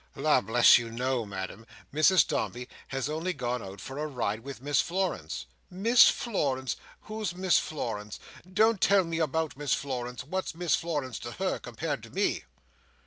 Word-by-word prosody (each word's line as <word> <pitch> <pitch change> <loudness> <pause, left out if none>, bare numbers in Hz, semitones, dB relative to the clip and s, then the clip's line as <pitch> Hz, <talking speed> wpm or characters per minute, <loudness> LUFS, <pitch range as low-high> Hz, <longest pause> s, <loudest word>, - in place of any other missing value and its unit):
"La - - +3
bless 120 +4 +6
you, 115 -1 -5
no, 125 0 -1
Ma'am. 95 +2 -6 0.3
Mrs 155 +1 +5
Dombey 125 +1 -2 0.2
has 135 0 -2
only 160 +4 -2
gone 125 -4 -2
out 95 0 -9
for 135 +2 -7
a 155 - -1
ride 115 -6 -2
with 135 +3 -8
Miss 145 +2 +2
Florence." 170 - -2 0.2
"Miss 225 +7 +6
Florence. 135 - -1 0.3
Who's 215 -4 -4
Miss 180 -4 +3
Florence? 105 -8 -4 0.3
Don't 215 +1 +3
tell 200 -1 +5
me 165 -1 -3
about 160 -2 -1
Miss 145 -1 +1
Florence. 125 -3 -4
What's 185 +5 -3
Miss 170 -3 0
Florence 145 -8 -1
to - - -7
her, - - -1
compared - - -4
to - - -12
me?" - - 0
140 Hz, 165 wpm, -29 LUFS, 120-175 Hz, 0.3 s, bless